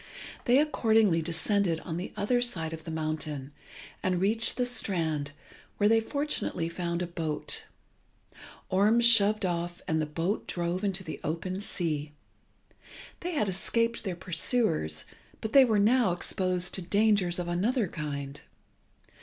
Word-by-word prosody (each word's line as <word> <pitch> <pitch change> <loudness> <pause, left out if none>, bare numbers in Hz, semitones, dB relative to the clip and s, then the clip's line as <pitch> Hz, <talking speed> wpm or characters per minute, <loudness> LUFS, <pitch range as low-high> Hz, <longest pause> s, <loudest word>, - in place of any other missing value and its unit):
They 245 +1 +5
accordingly 220 - +3
descended 170 +1 0
on 165 -1 -5
the 180 - -5
other 245 +4 +1
side 165 -10 0
of 160 -1 -8
the - - -6
mountain, 155 -3 -3 0.5
and 185 -1 0
reached 220 +4 +1
the 250 - +1
strand, 160 -11 -1 0.5
where 205 - +3
they 225 +1 +4
fortunately 255 - -2
found 170 0 -3
a - - -1
boat. 165 -3 -1 1.0
Orm 205 +5 +3
shoved 215 -3 +5
off, 175 -1 -2
and 160 -3 +1
the 155 - -2
boat 165 +7 -2
drove 175 +2 -2
into 195 -2 -1
the 160 - -7
open 180 +5 -3
sea. 155 -6 -1 1.1
They 355 +1 -4
had 215 -9 0
escaped 230 +5 0
their 190 -4 -3
pursuers, 170 - 0 0.3
but 220 - -5
they 275 -1 +8
were 220 -3 +2
now 215 -1 +3
exposed 180 0 -1
to 190 - -1
dangers 200 -1 +2
of 175 -1 -3
another 205 +6 0
kind. 140 -3 -5
185 Hz, 145 wpm, -28 LUFS, 165-220 Hz, 1.1 s, they